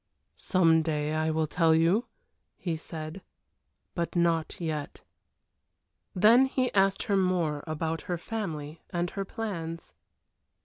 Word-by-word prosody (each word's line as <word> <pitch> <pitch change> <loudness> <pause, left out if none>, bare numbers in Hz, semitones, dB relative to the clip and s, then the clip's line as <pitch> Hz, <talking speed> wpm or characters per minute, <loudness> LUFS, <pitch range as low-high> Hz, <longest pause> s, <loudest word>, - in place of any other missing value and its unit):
"Some 165 -3 +4
day 155 -1 -1
I 155 0 +1
will 160 0 +1
tell 160 +1 +3
you," 170 +9 +3 0.5
he 170 -3 -2
said. 160 +2 -7 0.7
"But 170 0 -3
not 170 -2 +1
yet." 155 -4 -4 1.1
Then 230 +8 +6
he 255 -1 -1
asked 195 0 +3
her 205 -4 0
more 175 -6 +1
about 160 +1 -2
her 175 - 0
family 165 -7 -5
and 175 0 -2
her 195 -1 -3
plans. 170 -6 -5
165 Hz, 125 wpm, -28 LUFS, 160-190 Hz, 1.1 s, Then